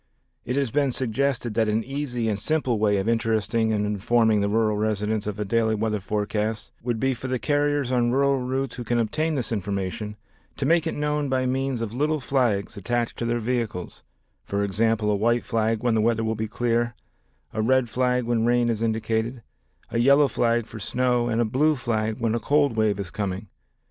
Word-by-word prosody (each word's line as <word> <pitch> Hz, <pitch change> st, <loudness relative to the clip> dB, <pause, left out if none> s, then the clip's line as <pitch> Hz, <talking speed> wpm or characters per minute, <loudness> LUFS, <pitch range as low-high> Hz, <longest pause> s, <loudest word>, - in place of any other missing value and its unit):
It 125 Hz, -, -2 dB
has 140 Hz, -4 st, 0 dB
been 140 Hz, -2 st, +2 dB
suggested 125 Hz, -1 st, -1 dB
that 110 Hz, 0 st, +1 dB
an 110 Hz, +1 st, +1 dB
easy 130 Hz, -4 st, -3 dB
and 105 Hz, -2 st, -1 dB
simple 130 Hz, -2 st, 0 dB
way 105 Hz, -1 st, +3 dB
of 95 Hz, +2 st, -1 dB
interesting 115 Hz, -1 st, +1 dB
and 105 Hz, -1 st, 0 dB
informing 105 Hz, +1 st, +2 dB
the 100 Hz, -, +1 dB
rural 110 Hz, 0 st, +2 dB
residents 105 Hz, 0 st, -1 dB
of 105 Hz, -, -2 dB
the 105 Hz, 0 st, -3 dB
daily 110 Hz, +1 st, +1 dB
weather 110 Hz, 0 st, -1 dB
forecasts 105 Hz, +2 st, -2 dB
would 120 Hz, -1 st, -2 dB
be 135 Hz, +2 st, +1 dB
for 125 Hz, +2 st, -6 dB
the 130 Hz, 0 st, 0 dB
carriers 145 Hz, +3 st, 0 dB
on 120 Hz, -2 st, +2 dB
rural 140 Hz, +2 st, +2 dB
routes 130 Hz, 0 st, -2 dB
who 120 Hz, -, -4 dB
can 120 Hz, +1 st, 0 dB
obtain 155 Hz, +8 st, 0 dB
this 125 Hz, -5 st, -2 dB
information 100 Hz, 0 st, -3 dB, 0.4 s
to 135 Hz, -, -1 dB
make 165 Hz, +2 st, +3 dB
it -, -, -2 dB
known 150 Hz, -1 st, -1 dB
by 130 Hz, -1 st, +1 dB
means 130 Hz, -1 st, -1 dB
of 110 Hz, -1 st, -5 dB
little 150 Hz, +4 st, 0 dB
flags 125 Hz, -6 st, 0 dB
attached 120 Hz, +3 st, -1 dB
to 120 Hz, -, -1 dB
their 120 Hz, 0 st, 0 dB
vehicles, 115 Hz, -6 st, -3 dB, 0.4 s
for 100 Hz, 0 st, -1 dB
example, 105 Hz, +1 st, +1 dB
a -, -, +2 dB
white 115 Hz, +4 st, +1 dB
flag 115 Hz, -1 st, 0 dB
when 120 Hz, -2 st, +2 dB
the 110 Hz, -, +2 dB
weather 115 Hz, 0 st, +1 dB
will 110 Hz, 0 st, 0 dB
be 110 Hz, 0 st, -3 dB
clear, 120 Hz, +1 st, 0 dB, 0.6 s
a 110 Hz, -, -1 dB
red 130 Hz, +2 st, +3 dB
flag 125 Hz, +1 st, +1 dB
when 115 Hz, -1 st, 0 dB
rain 120 Hz, 0 st, +3 dB
is 115 Hz, -2 st, -1 dB
indicated, 115 Hz, +1 st, -1 dB, 0.5 s
a 115 Hz, -, 0 dB
yellow 140 Hz, +4 st, +5 dB
flag 120 Hz, -2 st, +1 dB
for 110 Hz, -, -9 dB
snow 125 Hz, +2 st, +1 dB
and 115 Hz, -1 st, 0 dB
a 120 Hz, -, +3 dB
blue 150 Hz, +8 st, +2 dB
flag 110 Hz, -4 st, -1 dB
when 115 Hz, -2 st, 0 dB
a 120 Hz, -, 0 dB
cold 140 Hz, +1 st, +2 dB
wave 110 Hz, -3 st, +1 dB
is 95 Hz, -3 st, -5 dB
coming. 100 Hz, -1 st, -4 dB
115 Hz, 205 wpm, -25 LUFS, 110-125 Hz, 0.6 s, yellow